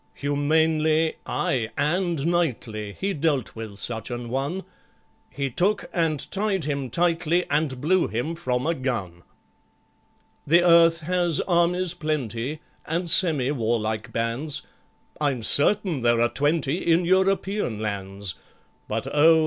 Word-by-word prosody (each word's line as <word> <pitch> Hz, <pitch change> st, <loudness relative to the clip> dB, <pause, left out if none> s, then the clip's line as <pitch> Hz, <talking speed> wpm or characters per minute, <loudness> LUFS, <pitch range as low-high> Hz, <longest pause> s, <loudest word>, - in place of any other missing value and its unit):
Humanely, 155 Hz, +2 st, +1 dB
ay, 115 Hz, -4 st, -1 dB
and 170 Hz, -1 st, 0 dB
knightly 120 Hz, -11 st, -1 dB
He 195 Hz, +1 st, -1 dB
dealt 145 Hz, -4 st, -1 dB
with 110 Hz, -2 st, -7 dB
such 115 Hz, +1 st, -4 dB
an 120 Hz, -1 st, -5 dB
one; 140 Hz, +9 st, -2 dB, 0.7 s
He 135 Hz, 0 st, -3 dB
took 200 Hz, -, 0 dB
and 160 Hz, -4 st, -1 dB
tied 195 Hz, -2 st, -1 dB
him 140 Hz, -3 st, -2 dB
tightly, 170 Hz, +3 st, +1 dB
And 145 Hz, -3 st, 0 dB
blew 180 Hz, +6 st, +2 dB
him 120 Hz, -, -3 dB
from 130 Hz, -6 st, -2 dB
a 165 Hz, -, +1 dB
gun. 110 Hz, -, -4 dB, 1.3 s
The 170 Hz, +4 st, +5 dB
earth 170 Hz, -1 st, +5 dB
has 175 Hz, -1 st, 0 dB
armies 175 Hz, 0 st, +1 dB
plenty, 150 Hz, -4 st, -3 dB, 0.3 s
And 170 Hz, +1 st, 0 dB
semi 150 Hz, -7 st, +4 dB
warlike 115 Hz, -3 st, -2 dB
bands, 115 Hz, +7 st, -1 dB, 0.6 s
I'm 135 Hz, -6 st, 0 dB
certain 170 Hz, -, +3 dB
there 120 Hz, -1 st, +3 dB
are 120 Hz, 0 st, +3 dB
twenty 145 Hz, +1 st, +1 dB
In 170 Hz, +1 st, +2 dB
European 190 Hz, -, +1 dB
lands; 100 Hz, -2 st, -3 dB, 0.5 s
But, 110 Hz, +1 st, -3 dB
oh! 160 Hz, +2 st, +6 dB
150 Hz, 125 wpm, -24 LUFS, 120-170 Hz, 1.3 s, oh